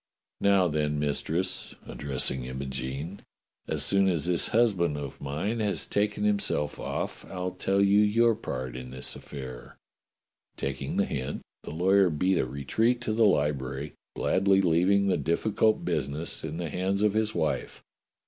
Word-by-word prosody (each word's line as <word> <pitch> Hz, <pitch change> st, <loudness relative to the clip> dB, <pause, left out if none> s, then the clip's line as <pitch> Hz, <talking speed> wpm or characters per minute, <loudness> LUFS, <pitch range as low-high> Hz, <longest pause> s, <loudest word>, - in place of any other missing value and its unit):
Now, 100 Hz, -2 st, +4 dB
then. 75 Hz, -2 st, 0 dB
Mistress," 80 Hz, +5 st, -1 dB
addressing 65 Hz, -2 st, -2 dB
Imogene, 65 Hz, +6 st, -5 dB, 0.5 s
"as -, -, +1 dB
soon 100 Hz, 0 st, +3 dB
as 85 Hz, -4 st, 0 dB
this 90 Hz, -2 st, +2 dB
husband 95 Hz, -10 st, +2 dB
of 70 Hz, -2 st, -7 dB
mine 80 Hz, +12 st, -2 dB
has 105 Hz, -2 st, 0 dB
taken 105 Hz, 0 st, 0 dB
himself 100 Hz, -8 st, 0 dB
off, -, -, -4 dB
I'll 90 Hz, -1 st, -3 dB
tell 95 Hz, +2 st, 0 dB
you 100 Hz, +1 st, +5 dB
your 115 Hz, +3 st, +4 dB
part 65 Hz, -, -5 dB
in 65 Hz, 0 st, -7 dB
this 65 Hz, 0 st, -5 dB
affair." 65 Hz, -4 st, -9 dB, 0.8 s
Taking -, -, -3 dB
the -, -, +3 dB
hint, 65 Hz, -2 st, -4 dB, 0.2 s
the -, -, -9 dB
lawyer 95 Hz, +4 st, +4 dB
beat 90 Hz, +3 st, +1 dB
a -, -, 0 dB
retreat 110 Hz, -, 0 dB
to 110 Hz, -2 st, -1 dB
the 110 Hz, 0 st, +5 dB
library, 70 Hz, -3 st, 0 dB, 0.2 s
gladly 95 Hz, +1 st, +3 dB
leaving 95 Hz, +3 st, +3 dB
the 95 Hz, -, +2 dB
difficult 105 Hz, +8 st, +1 dB
business 75 Hz, -1 st, -2 dB
in 80 Hz, 0 st, -4 dB
the 85 Hz, -2 st, -3 dB
hands 95 Hz, +4 st, 0 dB
of 105 Hz, -2 st, +3 dB
his 110 Hz, 0 st, 0 dB
wife. 75 Hz, -2 st, -2 dB
85 Hz, 150 wpm, -28 LUFS, 70-100 Hz, 0.8 s, you